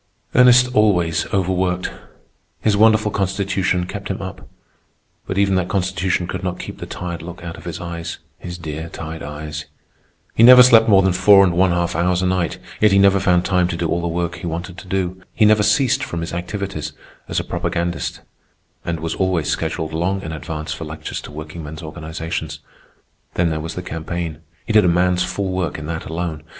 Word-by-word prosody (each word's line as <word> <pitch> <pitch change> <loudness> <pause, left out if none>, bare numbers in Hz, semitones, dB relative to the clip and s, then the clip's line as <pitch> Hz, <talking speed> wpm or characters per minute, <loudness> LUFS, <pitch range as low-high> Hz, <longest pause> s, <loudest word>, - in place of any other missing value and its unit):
Ernest 125 0 +6
always 90 -6 +2
overworked. 90 -1 0 0.7
His 105 -2 +2
wonderful 110 0 +4
constitution 95 -2 0
kept 100 +2 -6
him 95 - -3
up; 95 0 -8 0.8
but 95 - -3
even 100 -1 +3
that 95 -1 +1
constitution 95 -1 0
could 90 +1 -5
not 90 -1 -2
keep - - -8
the - - -6
tired 85 -2 -5
look 85 +1 -9
out 85 -1 -6
of - - -13
his 85 -1 -5
eyes. 85 -1 -5 0.2
His 90 0 -7
dear, 80 0 -6
tired 80 0 -7
eyes! 75 0 -6 0.7
He - - +1
never 125 +1 +10
slept 115 -3 +6
more 100 -2 +6
than 95 -1 +2
four 100 +2 +7
and 90 -3 +2
one 95 +2 +3
half 85 -1 0
hours 90 +2 +1
a - - +1
night; 90 -2 0 0.2
yet 105 -1 +5
he 100 - +4
never 100 0 +5
found 90 -2 +2
time 90 -2 +2
to 85 - -3
do 85 0 -1
all 85 - 0
the 85 - -2
work 85 0 -2
he 90 - -6
wanted 85 +2 -5
to - - -13
do. 95 0 -2
He 110 - +4
never 105 0 +5
ceased 110 +4 +2
from 85 - -4
his 85 - -5
activities 90 -3 -4 0.3
as - - -1
a - - -2
propagandist, 85 0 -3 0.6
and 85 -2 -3
was 80 0 -2
always 95 -5 0
scheduled 80 0 -2
long 95 +4 -1
in 80 - -5
advance 80 0 -5
for - - -7
lectures 80 0 -6
to - - -10
workingmen's 75 +1 -8
organizations. 80 +1 -5 0.8
Then 85 -2 +2
there 80 - -2
was 80 +2 -6
the 90 - -5
campaign. 80 -1 -4 0.3
He 110 - -2
did 105 -1 +6
a - - +3
man's 90 +1 +2
full 95 +2 -2
work 90 -4 -2
in 75 - -7
that 80 +1 -4
alone. 80 -1 -4
90 Hz, 200 wpm, -20 LUFS, 80-95 Hz, 0.8 s, never